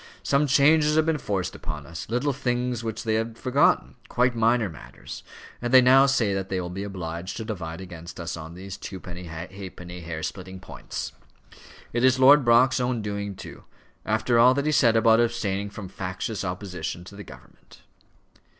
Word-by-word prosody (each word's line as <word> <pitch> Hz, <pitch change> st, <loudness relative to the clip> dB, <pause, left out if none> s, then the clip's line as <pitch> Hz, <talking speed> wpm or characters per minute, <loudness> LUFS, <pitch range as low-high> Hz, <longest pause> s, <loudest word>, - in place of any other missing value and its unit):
Some 140 Hz, +1 st, +2 dB
changes 150 Hz, +3 st, +4 dB
have 155 Hz, 0 st, +4 dB
been 160 Hz, -2 st, +1 dB
forced 95 Hz, -, -2 dB
upon 75 Hz, -1 st, -7 dB
us; 85 Hz, +3 st, -8 dB
little 125 Hz, +5 st, 0 dB
things 125 Hz, -2 st, -1 dB
which 115 Hz, 0 st, -4 dB
they 110 Hz, -1 st, 0 dB
had 115 Hz, +1 st, -1 dB
forgotten 135 Hz, +2 st, +2 dB, 0.2 s
quite 125 Hz, 0 st, +2 dB
minor 115 Hz, 0 st, +3 dB
matters; 80 Hz, -5 st, -10 dB, 0.4 s
and 120 Hz, 0 st, -2 dB
they 130 Hz, -, +9 dB
now 130 Hz, +2 st, +6 dB
say 120 Hz, -7 st, +2 dB
that 95 Hz, 0 st, -3 dB
they 95 Hz, -, -1 dB
will 90 Hz, -1 st, -4 dB
be 95 Hz, +2 st, -5 dB
obliged 90 Hz, -3 st, -5 dB
to 110 Hz, -, -5 dB
divide 90 Hz, -6 st, -5 dB
against 85 Hz, -2 st, -9 dB
us 85 Hz, -, -4 dB
on 80 Hz, 0 st, -9 dB
these 95 Hz, +1 st, -8 dB
twopenny 90 Hz, -2 st, -8 dB
halfpenny, 90 Hz, +1 st, -8 dB
hair 80 Hz, -1 st, -6 dB
splitting 95 Hz, +1 st, -6 dB
points. 95 Hz, -, -7 dB, 0.8 s
It 120 Hz, +1 st, 0 dB
is 130 Hz, 0 st, +5 dB
Lord 140 Hz, +2 st, +7 dB
Brock's 125 Hz, +2 st, +4 dB
own 125 Hz, -3 st, -1 dB
doing 100 Hz, -1 st, -4 dB
too, -, -, -11 dB, 0.4 s
after 110 Hz, +2 st, +1 dB
all 125 Hz, +2 st, +6 dB
that 140 Hz, +1 st, -1 dB
he 155 Hz, -, +2 dB
said 120 Hz, -6 st, +4 dB
about 115 Hz, 0 st, +5 dB
abstaining 105 Hz, -4 st, 0 dB
from 100 Hz, -1 st, -8 dB
factious 95 Hz, +3 st, -4 dB
opposition 90 Hz, -2 st, -5 dB
to 95 Hz, +3 st, -12 dB
the 105 Hz, -, -8 dB
government." -, -, -16 dB
105 Hz, 180 wpm, -25 LUFS, 90-125 Hz, 0.8 s, they